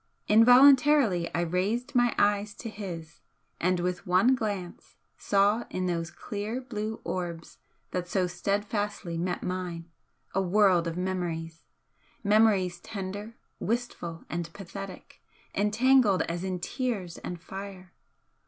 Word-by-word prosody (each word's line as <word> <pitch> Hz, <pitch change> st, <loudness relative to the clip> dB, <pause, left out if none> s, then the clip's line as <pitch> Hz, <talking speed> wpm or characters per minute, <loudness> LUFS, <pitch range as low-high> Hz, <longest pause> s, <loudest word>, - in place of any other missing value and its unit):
Involuntarily 250 Hz, -, +6 dB
I 170 Hz, -, +1 dB
raised 190 Hz, +10 st, -1 dB
my 245 Hz, -2 st, +3 dB
eyes 205 Hz, 0 st, +2 dB
to 230 Hz, -, -6 dB
his, 175 Hz, -6 st, -7 dB, 0.4 s
and 180 Hz, +1 st, +1 dB
with 180 Hz, 0 st, -2 dB
one 185 Hz, +8 st, +5 dB
glance 205 Hz, -7 st, -4 dB, 0.2 s
saw 205 Hz, +3 st, +2 dB
in 185 Hz, -, -2 dB
those 170 Hz, -2 st, -1 dB
clear 210 Hz, +6 st, -5 dB
blue 220 Hz, -4 st, -5 dB
orbs 170 Hz, -3 st, -5 dB, 0.3 s
that 180 Hz, -1 st, -2 dB
so 185 Hz, +1 st, +1 dB
steadfastly 200 Hz, 0 st, -2 dB
met 180 Hz, +1 st, -2 dB
mine 175 Hz, -2 st, -4 dB, 0.4 s
a 195 Hz, -, +2 dB
world 185 Hz, -2 st, +3 dB
of 165 Hz, +1 st, -4 dB
memories 170 Hz, -3 st, -3 dB, 0.6 s
memories 200 Hz, -4 st, +3 dB
tender, 205 Hz, +2 st, -6 dB, 0.2 s
wistful 215 Hz, -8 st, -3 dB
and 170 Hz, -1 st, -4 dB
pathetic, 195 Hz, -1 st, -9 dB, 0.3 s
entangled 215 Hz, -1 st, +4 dB
as 170 Hz, +1 st, -4 dB
in 185 Hz, -1 st, -2 dB
tears 195 Hz, -4 st, -3 dB
and 175 Hz, -, -6 dB
fire. 190 Hz, 0 st, -9 dB
190 Hz, 120 wpm, -28 LUFS, 175-215 Hz, 0.6 s, Involuntarily